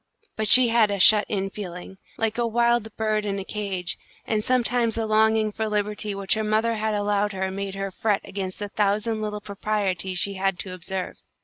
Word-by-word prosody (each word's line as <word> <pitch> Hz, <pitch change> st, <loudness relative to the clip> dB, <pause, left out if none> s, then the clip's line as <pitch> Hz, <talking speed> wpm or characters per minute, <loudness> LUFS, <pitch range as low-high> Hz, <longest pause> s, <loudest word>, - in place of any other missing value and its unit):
But 215 Hz, 0 st, -1 dB
she 250 Hz, +3 st, +8 dB
had 225 Hz, -2 st, +4 dB
a 200 Hz, -, -1 dB
shut 210 Hz, +2 st, +7 dB
in 195 Hz, -2 st, -2 dB
feeling, 190 Hz, -1 st, -8 dB, 0.2 s
like 225 Hz, +1 st, -1 dB
a 235 Hz, -, +1 dB
wild 235 Hz, 0 st, +2 dB
bird 215 Hz, -1 st, 0 dB
in 200 Hz, -1 st, -2 dB
a 195 Hz, -, -4 dB
cage, 195 Hz, -4 st, -3 dB, 0.3 s
and 215 Hz, -1 st, 0 dB
sometimes 245 Hz, -2 st, +1 dB
the 225 Hz, -1 st, -1 dB
longing 220 Hz, 0 st, +3 dB
for 220 Hz, +1 st, -3 dB
liberty 210 Hz, 0 st, -2 dB
which 195 Hz, -1 st, +1 dB
her 220 Hz, -, -1 dB
mother 215 Hz, +2 st, +1 dB
had 220 Hz, -1 st, -1 dB
allowed 205 Hz, 0 st, 0 dB
her 190 Hz, 0 st, -2 dB
made 195 Hz, 0 st, -4 dB
her 195 Hz, 0 st, -4 dB
fret 205 Hz, +1 st, 0 dB
against 190 Hz, -1 st, -5 dB
the 205 Hz, -1 st, -5 dB
thousand 215 Hz, +2 st, 0 dB
little 210 Hz, -1 st, -4 dB
proprieties 195 Hz, -3 st, -2 dB
she 200 Hz, +3 st, -1 dB
had 195 Hz, -1 st, -1 dB
to 185 Hz, 0 st, -5 dB
observe. 185 Hz, +1 st, -5 dB
210 Hz, 200 wpm, -24 LUFS, 195-220 Hz, 0.3 s, she